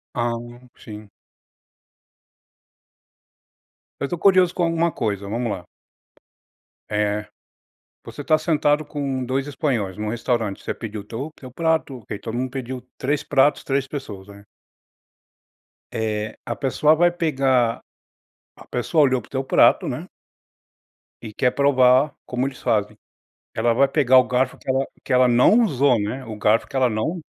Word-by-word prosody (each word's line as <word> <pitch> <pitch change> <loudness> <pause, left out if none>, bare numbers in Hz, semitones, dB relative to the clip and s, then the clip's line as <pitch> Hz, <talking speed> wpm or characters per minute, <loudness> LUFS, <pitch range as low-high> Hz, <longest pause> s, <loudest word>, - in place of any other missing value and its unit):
Ah, 120 -1 0 0.4
sim. 105 -2 -11 2.9
Eu 140 - -1
tô 175 - -4
curioso 185 -1 +4
com 175 - 0
alguma 165 0 +1
coisa. 105 -8 -3
Vamos 115 +2 -2
lá! 90 -3 -5 1.3
É. 105 0 -1 0.8
Você 145 - -8
tá 155 +2 +4
sentado 155 -1 +1
com 140 -3 -3
dois 130 +2 -1
espanhóis 130 - -2
num 105 +1 -4
restaurante, 115 -3 -2
você - - -3
pediu 110 -2 -7
teu 120 +8 -6
teu 130 -2 -12
prato, 160 -2 0
ok, 105 -1 -7
todo 110 +2 -7
mundo 130 +2 -2
pediu 130 -1 -6 0.2
3 145 +2 -1
pratos, 145 +1 +2
3 135 -1 -1
pessoas 110 -9 -7
né. 100 0 -13 1.5
Eh, 110 -1 -2
a 115 - -3
pessoa 140 +3 +2
vai 175 +2 +4
pegar 135 -8 +1 0.7
a - - -16
pessoa 150 +6 +1
olhou 130 -2 +1
pro - - -20
teu 135 -1 -2
prato, 135 - +4
né - - -5 1.1
e 110 -2 -8
quer 125 +4 +1
provar 135 0 +4
como 125 +1 -1
eles 135 - -11
fazem. 105 -2 0 0.6
Ela 120 - +2
vai 135 +4 +4
pegar 135 -2 +4
o 130 - +1
garfo 125 +1 0
que - - -10
ela 135 +1 +1 0.2
que - - -7
ela 125 0 +5
não 125 - +5
usou, 140 - +2
né, 110 +6 -3
o 110 -2 -7
garfo 110 +1 +2
que - - -12
ela 130 -1 +3
não 115 +11 -2
130 Hz, 150 wpm, -22 LUFS, 110-145 Hz, 2.9 s, ela